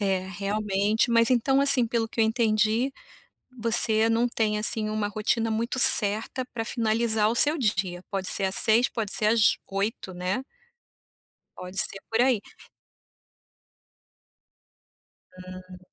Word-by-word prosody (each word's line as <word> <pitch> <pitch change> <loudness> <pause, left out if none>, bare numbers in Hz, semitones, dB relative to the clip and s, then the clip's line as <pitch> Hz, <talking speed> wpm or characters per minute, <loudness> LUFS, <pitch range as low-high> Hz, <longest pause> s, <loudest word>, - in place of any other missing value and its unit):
É 195 -2 0
realmente, 205 +2 -1
mas, 230 0 +3
então, 265 +2 +1
assim, 275 -4 +6
pelo 225 -1 -2
que 225 - -4
eu - - +4
entendi, 220 +2 0 0.6
você 225 -1 +1
não 230 +2 +1
tem 215 -2 -1
assim 215 0 0
uma 215 -1 -2
rotina 215 +2 -1
muito 230 +3 -3
certa 220 +4 +3
pra 225 -1 -4
finalizar 225 -2 0
o 235 - -3
seu 295 +5 +3
dia, 195 - -2
pode 195 -2 -4
ser 195 - 0
às 190 +1 0
18h, 235 +4 +3
pode 220 -4 -3
ser 210 - 0
às 220 -1 +3
20h, 195 -1 -4
né? 180 +7 -3 1.1
Pode 180 +1 -9
ser 195 -1 -1
por 225 +1 +1
aí. 250 -4 +2 3.0
Hum. 185 0 -12
220 Hz, 135 wpm, -25 LUFS, 200-235 Hz, 3.0 s, assim